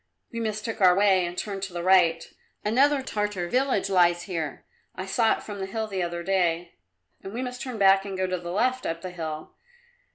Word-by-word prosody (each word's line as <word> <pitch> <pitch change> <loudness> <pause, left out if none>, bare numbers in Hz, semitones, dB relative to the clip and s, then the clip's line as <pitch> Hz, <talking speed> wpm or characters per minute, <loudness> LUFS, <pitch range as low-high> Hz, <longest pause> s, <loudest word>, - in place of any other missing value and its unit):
"We 230 - -4
mistook 220 0 -3
our 180 -1 +7
way, 190 -3 +4
and 175 +1 -7
turned 200 -2 -4
to 195 -2 -5
the 175 -1 -4
right. 175 -3 +3 0.3
Another 270 +5 +3
Tartar 210 -7 -2
village 255 -2 +1
lies 175 -2 +3
here; 165 -6 -4 0.3
I 185 - -5
saw 220 +3 +2
it - - -6
from 205 -2 -7
the 190 - -3
hill 220 +3 -3
the 195 -3 -3
other 170 0 -3
day. 175 -2 0 0.5
We 225 +6 -5
must 250 -1 -6
turn 255 -3 -5
back 195 -1 +5
and 195 -1 -5
go 185 - 0
to 185 -1 -2
the 175 0 -7
left 255 +6 0
up 165 0 -3
the 185 - -5
hill. 160 -3 -6
195 Hz, 205 wpm, -26 LUFS, 175-215 Hz, 0.5 s, our